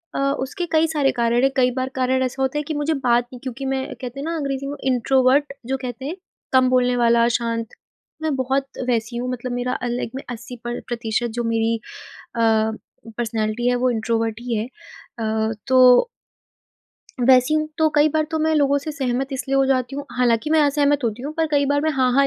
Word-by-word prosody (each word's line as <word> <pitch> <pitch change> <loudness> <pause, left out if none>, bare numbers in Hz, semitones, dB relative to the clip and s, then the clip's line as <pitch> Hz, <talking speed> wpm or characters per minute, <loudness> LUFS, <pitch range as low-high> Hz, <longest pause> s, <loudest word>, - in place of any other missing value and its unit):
अ, - - -1 0.2
उसके 315 +7 -3
कई 320 0 +3
सारे 295 -4 +1
कारण 235 +1 +1
हैं। 270 - +4
कई 250 -1 +4
बार 260 0 -1
कारण 260 0 +1
ऐसा 260 +1 -3
होता 265 +2 -1
है - - -2
कि 310 - -4
मुझे 295 +2 0
बात 245 -4 +2
नहीं 250 - -8
क्योंकि 265 +1 -5
मैं, 265 0 -1 0.2
कहते 250 +1 -6
हैं 280 - -4
ना, 335 +1 -2
अंग्रेज़ी 275 -2 -3
में, 285 - -4
इंट्रोवर्ट 265 +2 +2
जो 270 +1 0
कहते 250 0 -6
हैं, 310 +5 -3 0.4
कम 255 -1 +5
बोलने 250 -1 +3
वाला, 235 -1 +4
शांत, 230 -1 -3 0.6
मैं 310 -3 0
बहुत 265 +1 0 0.2
वैसी 235 0 -1
हूँ। 250 +1 -3
मतलब 250 0 -4
मेरा 245 +1 -1
अलग 240 -1 -2
में 270 - -5
80 245 +1 -8
प्र 240 0 -3
प्रतिशत 235 0 -1
जो - - 0
मेरी 230 0 +1 0.6
अ, - - -1 0.8
पर्सनैलिटी 225 0 -1
है, 245 - +2
वो 250 +1 +1
इंट्रोवर्ट 225 -1 -1
ही 240 -1 -3
है 215 - -1 0.6
अ, 220 0 0 0.2
तो 255 - +6 1.1
वैसी 255 +3 +5
हूँ। 310 0 +1
तो 315 -1 +4
कई 295 +1 +5
बार 310 +1 +1
तो 320 - 0
मैं 315 +1 +2
लोगों 285 -1 +3
से 285 +2 -4
सहमत 265 -3 -1
इसलिए 270 +1 -2
हो 270 0 +4
जाती 260 -1 0
हूँ 285 0 -5
हालाँकि 240 +1 +2
मैं 315 0 +4
असहमत 290 -1 +2
होती 230 0 -2
हूँ, 295 +2 -4
पर 325 0 0
कई 285 -1 +3
बार 285 +1 +1
मैं 315 - +1
हाँ, 260 -3 +2
हाँ, 275 +2 +4
255 Hz, 210 wpm, -22 LUFS, 240-280 Hz, 1.1 s, तो